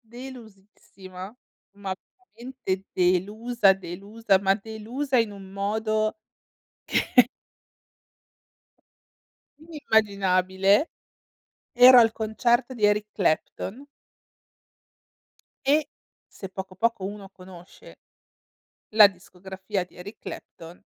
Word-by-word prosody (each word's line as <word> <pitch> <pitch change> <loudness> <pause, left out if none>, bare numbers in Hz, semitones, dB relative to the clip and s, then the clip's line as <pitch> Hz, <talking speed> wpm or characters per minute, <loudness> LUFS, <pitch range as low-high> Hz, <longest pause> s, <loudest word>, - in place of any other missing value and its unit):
delusissima, 210 -5 -12 0.4
ma 195 -2 -4 0.4
veramente 235 -6 -5
delusa, 200 +5 +2
delusa, 195 +3 -1
ma 195 0 +3
delusa 225 +6 -4
in 230 -2 +1
un 195 -1 -12
modo 215 +2 -1 0.9
che 250 -2 +5 2.4
inimmaginabile. 200 - +1 0.9
Ero 250 +1 +9
al 225 -1 +5
concerto 235 +4 0
di 215 -4 -2
Eric 210 0 +3
Clapton. 205 - -2 1.8
E 295 +2 +3 0.4
se 195 - -10
poco 190 0 -8
poco, 225 0 -1
uno 200 0 -7
conosce 185 -2 -15 1.0
la 215 -2 +9
discografia 190 +1 -6
di 180 - -20
Eric 195 +5 -10
Clapton, 170 +3 -11
205 Hz, 85 wpm, -25 LUFS, 190-230 Hz, 2.4 s, Ero